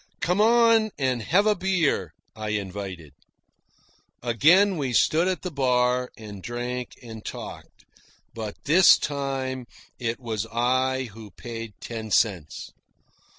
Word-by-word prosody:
"Come 180 Hz, +4 st, +1 dB
on 230 Hz, -1 st, +5 dB
and 130 Hz, -3 st, 0 dB
have 190 Hz, -, +2 dB
a 215 Hz, -, +4 dB
beer," 175 Hz, -, 0 dB, 0.2 s
I 110 Hz, -1 st, -5 dB
invited. 95 Hz, -6 st, -7 dB, 1.1 s
Again 170 Hz, -, +4 dB
we 135 Hz, -4 st, -2 dB
stood 160 Hz, +8 st, +3 dB
at 185 Hz, -1 st, -2 dB
the 180 Hz, -, -4 dB
bar 125 Hz, -2 st, +1 dB
and 105 Hz, -3 st, -9 dB
drank 120 Hz, +3 st, -5 dB
and 110 Hz, -2 st, -9 dB
talked, -, -, -9 dB, 0.5 s
but 110 Hz, -2 st, -5 dB
this 170 Hz, +6 st, +7 dB
time 135 Hz, -3 st, -3 dB, 0.3 s
it 115 Hz, -1 st, -2 dB
was 115 Hz, -3 st, -3 dB
I 130 Hz, +3 st, +1 dB
who 110 Hz, -1 st, -11 dB
paid 115 Hz, 0 st, -8 dB
ten 110 Hz, -2 st, -6 dB
cents! 95 Hz, -9 st, 0 dB
125 Hz, 125 wpm, -25 LUFS, 110-155 Hz, 1.1 s, this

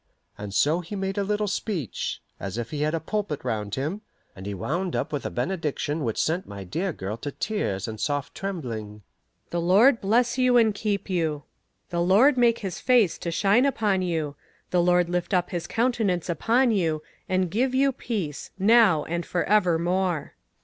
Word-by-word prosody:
And 105 Hz, -1 st, -7 dB
so 150 Hz, -, +2 dB
he 180 Hz, +4 st, -7 dB
made 195 Hz, +1 st, -2 dB
a -, -, +1 dB
little 210 Hz, +1 st, 0 dB
speech, 195 Hz, -, -3 dB, 0.2 s
as 100 Hz, +2 st, -5 dB
if 115 Hz, -1 st, -4 dB
he 150 Hz, -, -3 dB
had 155 Hz, +2 st, +1 dB
a -, -, -1 dB
pulpit 190 Hz, -2 st, -3 dB
round 105 Hz, -2 st, -2 dB
him, 155 Hz, +10 st, -3 dB, 0.3 s
and 95 Hz, 0 st, -8 dB
he 100 Hz, -, -3 dB
wound 170 Hz, -, -2 dB
up -, -, -2 dB
with 145 Hz, -, -2 dB
a -, -, -4 dB
benediction 150 Hz, 0 st, -2 dB
which 115 Hz, -4 st, -2 dB
sent 170 Hz, +4 st, 0 dB
my 100 Hz, -1 st, -7 dB
dear 170 Hz, -, -2 dB
girl 105 Hz, -6 st, -5 dB
to 145 Hz, +4 st, -5 dB
tears 105 Hz, -, -2 dB
and 110 Hz, -1 st, -6 dB
soft 145 Hz, 0 st, -2 dB
trembling: 115 Hz, -, -5 dB, 0.5 s
"The 170 Hz, -, -1 dB
Lord 220 Hz, +9 st, +5 dB
bless 235 Hz, +5 st, +2 dB
you 250 Hz, -1 st, +4 dB
and 220 Hz, -3 st, +4 dB
keep 200 Hz, -1 st, -2 dB
you: 160 Hz, -6 st, -1 dB, 0.5 s
the 170 Hz, 0 st, 0 dB
Lord 210 Hz, +11 st, +5 dB
make 240 Hz, -2 st, +4 dB
his 190 Hz, -, -4 dB
face 240 Hz, -9 st, +3 dB
to 170 Hz, -, -3 dB
shine 200 Hz, +8 st, +3 dB
upon 210 Hz, -8 st, +1 dB
you; 160 Hz, -5 st, -2 dB, 0.4 s
the 180 Hz, -, +3 dB
Lord 180 Hz, 0 st, +3 dB
lift 180 Hz, +2 st, -1 dB
up 180 Hz, -1 st, 0 dB
his 175 Hz, -2 st, -3 dB
countenance 225 Hz, -8 st, 0 dB
upon 235 Hz, -, +2 dB
you, 165 Hz, -7 st, 0 dB, 0.3 s
and 185 Hz, -2 st, +1 dB
give 255 Hz, +5 st, +1 dB
you 275 Hz, +1 st, +4 dB
peace 205 Hz, -, -4 dB
now 200 Hz, -6 st, +5 dB
and 170 Hz, +1 st, -3 dB
for 175 Hz, -, -1 dB
evermore." 180 Hz, -4 st, +1 dB
180 Hz, 185 wpm, -25 LUFS, 150-210 Hz, 0.5 s, Lord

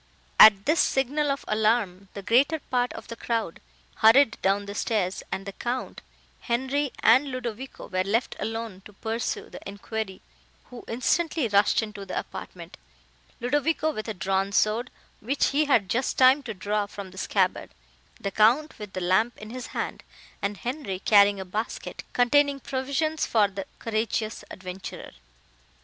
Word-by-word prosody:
At 205 Hz, -2 st, +9 dB
this 310 Hz, +3 st, +2 dB
signal 285 Hz, +3 st, +1 dB
of 275 Hz, 0 st, -2 dB
alarm, 215 Hz, -3 st, +1 dB
the 200 Hz, -, -6 dB
greater 265 Hz, +10 st, +3 dB
part 250 Hz, -4 st, -1 dB
of -, -, -9 dB
the 230 Hz, -, -7 dB
crowd 225 Hz, -7 st, -2 dB, 0.4 s
hurried 225 Hz, +2 st, +5 dB
down 200 Hz, +1 st, +1 dB
the 200 Hz, -, -6 dB
stairs, 200 Hz, -3 st, -1 dB
and 195 Hz, -, -3 dB
the 200 Hz, -, -5 dB
Count, 245 Hz, +5 st, -4 dB, 0.4 s
Henri 265 Hz, +3 st, -1 dB
and 255 Hz, +6 st, +6 dB
Ludovico 255 Hz, 0 st, -6 dB
were 185 Hz, 0 st, 0 dB
left 220 Hz, +6 st, 0 dB
alone 225 Hz, -4 st, -4 dB
to 210 Hz, -, -13 dB
pursue 225 Hz, +3 st, -3 dB
the -, -, -9 dB
enquiry, 200 Hz, -1 st, -5 dB, 0.5 s
who 245 Hz, -, -9 dB
instantly 300 Hz, +4 st, 0 dB
rushed 205 Hz, +1 st, +3 dB
into 210 Hz, -2 st, -7 dB
the 190 Hz, -, -5 dB
apartment, -, -, -7 dB, 0.6 s
Ludovico 295 Hz, +5 st, +1 dB
with 215 Hz, -6 st, -6 dB
a 220 Hz, -, -4 dB
drawn 195 Hz, +2 st, 0 dB
sword, 215 Hz, +5 st, +1 dB, 0.3 s
which 265 Hz, +6 st, +1 dB
he 295 Hz, +2 st, +2 dB
had 230 Hz, -9 st, +3 dB
just 245 Hz, +7 st, -1 dB
time 260 Hz, +2 st, +6 dB
to 235 Hz, -6 st, -6 dB
draw 205 Hz, +2 st, -1 dB
from 200 Hz, -2 st, -8 dB
the 190 Hz, -, -15 dB
scabbard, 190 Hz, -1 st, 0 dB, 0.5 s
the 200 Hz, -, -3 dB
Count 240 Hz, +10 st, +3 dB
with 210 Hz, -2 st, -8 dB
the 185 Hz, -, -4 dB
lamp 190 Hz, +7 st, +2 dB
in 215 Hz, +1 st, -9 dB
his 250 Hz, 0 st, -6 dB
hand, -, -, -4 dB, 0.4 s
and 200 Hz, 0 st, -2 dB
Henri 240 Hz, -6 st, -4 dB
carrying 200 Hz, 0 st, +5 dB
a 190 Hz, -, -5 dB
basket, 210 Hz, +5 st, -5 dB
containing 280 Hz, +3 st, +3 dB
provisions 280 Hz, +4 st, -1 dB
for 215 Hz, -3 st, +3 dB
the 195 Hz, 0 st, -7 dB
courageous 220 Hz, 0 st, -2 dB
adventurer. 185 Hz, 0 st, -8 dB
225 Hz, 160 wpm, -26 LUFS, 200-260 Hz, 0.6 s, At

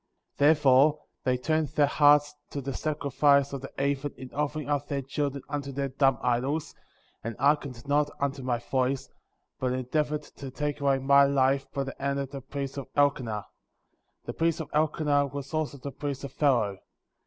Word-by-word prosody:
Therefore 145 Hz, 0 st, +5 dB, 0.2 s
they 130 Hz, -1 st, +2 dB
turned 155 Hz, +4 st, 0 dB
their 150 Hz, +1 st, +2 dB
hearts 145 Hz, 0 st, +4 dB, 0.2 s
to 145 Hz, -, -4 dB
the 135 Hz, 0 st, -4 dB
sacrifice 140 Hz, -1 st, +2 dB
of 135 Hz, -, -4 dB
the 135 Hz, -, -8 dB
heathen 140 Hz, +1 st, -1 dB
in 130 Hz, -1 st, -10 dB
offering 150 Hz, +1 st, -2 dB
up 145 Hz, -1 st, -1 dB
their 140 Hz, -1 st, -2 dB
children 140 Hz, 0 st, -3 dB
unto 140 Hz, -1 st, -4 dB
their 140 Hz, 0 st, -2 dB
dumb 135 Hz, 0 st, +2 dB
idols, 130 Hz, +5 st, 0 dB, 0.5 s
and 115 Hz, 0 st, -4 dB
hearkened 140 Hz, -4 st, 0 dB
not 145 Hz, +1 st, +2 dB
unto 140 Hz, 0 st, -1 dB
my 125 Hz, -2 st, 0 dB
voice, 130 Hz, +2 st, -1 dB, 0.5 s
but 130 Hz, -1 st, 0 dB
endeavored 150 Hz, +4 st, -1 dB
to 140 Hz, -, -10 dB
take 145 Hz, +2 st, -3 dB
away 140 Hz, -1 st, +3 dB
my 140 Hz, +1 st, +5 dB
life 135 Hz, 0 st, +1 dB
by 140 Hz, -, -2 dB
the 135 Hz, -, -7 dB
hand 140 Hz, 0 st, -1 dB
of 140 Hz, -1 st, -3 dB
the 140 Hz, -1 st, -6 dB
priest 140 Hz, +1 st, -5 dB
of 140 Hz, -, -6 dB
Elkenah. 130 Hz, -7 st, +1 dB, 0.8 s
The -, -, -4 dB
priest 165 Hz, 0 st, 0 dB
of 160 Hz, -, -6 dB
Elke 155 Hz, +1 st, +1 dB
nah 145 Hz, -1 st, +3 dB
was 140 Hz, 0 st, -7 dB
also 155 Hz, -2 st, -1 dB
the 140 Hz, +1 st, -6 dB
priest 140 Hz, -1 st, -5 dB
of 140 Hz, -1 st, -6 dB
Pharoah. 115 Hz, -10 st, +2 dB
140 Hz, 180 wpm, -28 LUFS, 135-145 Hz, 0.8 s, Therefore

